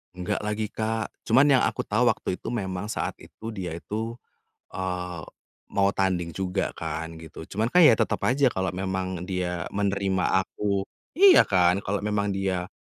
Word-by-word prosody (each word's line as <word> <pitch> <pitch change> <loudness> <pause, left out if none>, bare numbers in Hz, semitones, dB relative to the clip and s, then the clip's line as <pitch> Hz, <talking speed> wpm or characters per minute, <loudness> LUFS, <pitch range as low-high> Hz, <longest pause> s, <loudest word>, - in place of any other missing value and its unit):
Enggak 90 +3 -3
lagi 105 +1 -2
Kak, 110 0 -2 0.2
cuman 130 +6 +5
yang 130 - +3
aku - - -1
tahu 110 +4 +2
waktu 95 - -3
itu - - -6
memang 100 -2 -3
saat - - -2
itu 110 - -12
dia 95 -6 -4
itu, 115 +5 -5 0.5
eee, 90 -2 -4 0.5
mau 100 0 +3
tanding 95 -4 0
juga 90 +1 -2
kan 80 0 -4
gitu, 80 -1 -10
cuman 110 +3 0
kan 175 +9 +5
ya 135 -9 +7
tetep - - 0
aja 135 +3 +3
kalau 95 0 0
memang 95 -1 -3
dia 90 -2 -2
menerima 100 -2 0 0.2
aku 100 -1 -2 0.3
iya 385 -1 +9
kan, 90 0 +2
kalau 100 +2 -1
memang 105 -1 0
dia 95 -2 -2
95 Hz, 165 wpm, -26 LUFS, 90-110 Hz, 0.5 s, iya